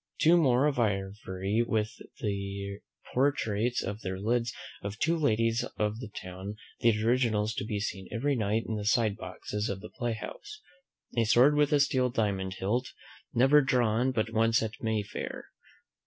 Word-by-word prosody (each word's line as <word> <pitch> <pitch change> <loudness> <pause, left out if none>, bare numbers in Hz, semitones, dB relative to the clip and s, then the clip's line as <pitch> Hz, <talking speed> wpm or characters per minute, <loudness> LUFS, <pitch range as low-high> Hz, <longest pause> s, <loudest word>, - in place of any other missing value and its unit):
Two 165 +2 +6
more 135 -5 +4
of 145 -4 +1
ivory, 95 -1 -1
with 110 -2 -1 0.2
the 100 -1 -3 0.3
portraitures 125 -4 +1
on 100 +2 -4
their 95 -1 -4
lids 115 +3 0 0.3
of 100 +1 -5
two 165 +7 +2
ladies 115 -6 +2
of 105 +1 -1
the 125 - -6
town; 95 0 -7 0.2
the 110 -2 +3
originals 115 -3 +2
to - - -3
be 105 -1 -2
seen 95 -2 -4
every 140 +5 0
night 110 -1 0
in 110 - -2
the 105 - -4
side 105 -1 +3
boxes 105 +2 -4
of 100 - -3
the 110 - -9
playhouse. 120 - -5 0.6
A 115 -1 +3
sword 125 +6 +6
with 150 -1 +3
a 145 - +4
steel 130 -3 +2
diamond 100 -5 -1
hilt, 120 +7 -1 0.4
never 135 +5 +6
drawn 125 -2 +2
but 110 -2 -1
once 115 0 +3
at 110 +1 -5
May 110 -2 0
fair. 100 - -6
110 Hz, 165 wpm, -29 LUFS, 100-125 Hz, 0.6 s, Two